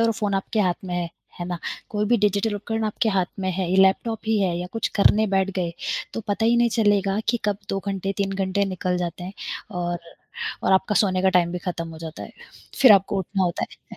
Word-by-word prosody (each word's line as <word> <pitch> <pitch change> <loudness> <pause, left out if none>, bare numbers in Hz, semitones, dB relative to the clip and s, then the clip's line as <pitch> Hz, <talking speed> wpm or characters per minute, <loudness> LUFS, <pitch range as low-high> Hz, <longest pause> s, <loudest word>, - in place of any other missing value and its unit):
और 230 0 +4
फ़ोन 210 -2 -1
आपके 200 +3 0
हाथ 180 -3 +2
में 180 - -4
है, 175 -1 -1 0.3
है - - -2
ना? 175 -1 -3 0.3
कोई 210 0 0
भी 240 - +5
डिजिटल 205 0 +1
उपकरण 225 +2 -3
आपके 220 +2 0
हाथ 185 -2 +2
में 190 0 0
है, 180 -1 -2
ये 190 - +2
लैपटॉप 195 +4 +3
ही 220 -1 +2
है 180 -3 +1
या 180 - -4
कुछ 225 - -1
करने 215 +2 +5
बैठ 190 0 +2
गए 170 -2 -1 0.4
तो 225 - -2
पता 205 +2 0
ही 235 +1 +4
नहीं 235 0 +4
चलेगा 205 -2 +3
कि 240 - +3
कब 205 -1 0
2 195 - -1
घंटे, 195 0 -2
3 195 -1 -1
घंटे 195 +1 0
निकल 185 -1 -1
जाते 175 0 -4
हैं 185 - -6 0.5
और 175 0 -1 0.6
और - - +2
आपका 190 +2 +3
सोने 185 -2 +2
का 190 - +5
टाइम 170 -1 0
भी 180 - -2
खत्म 170 -1 -4
हो 160 -1 -9
जाता 160 -1 -7
है, - - -9 0.5
फिर 255 -6 +9
आपको 195 0 +3
उठना 190 +1 -1
होता 175 -1 -1 0.3
है। - - -8
195 Hz, 235 wpm, -24 LUFS, 180-210 Hz, 0.6 s, फिर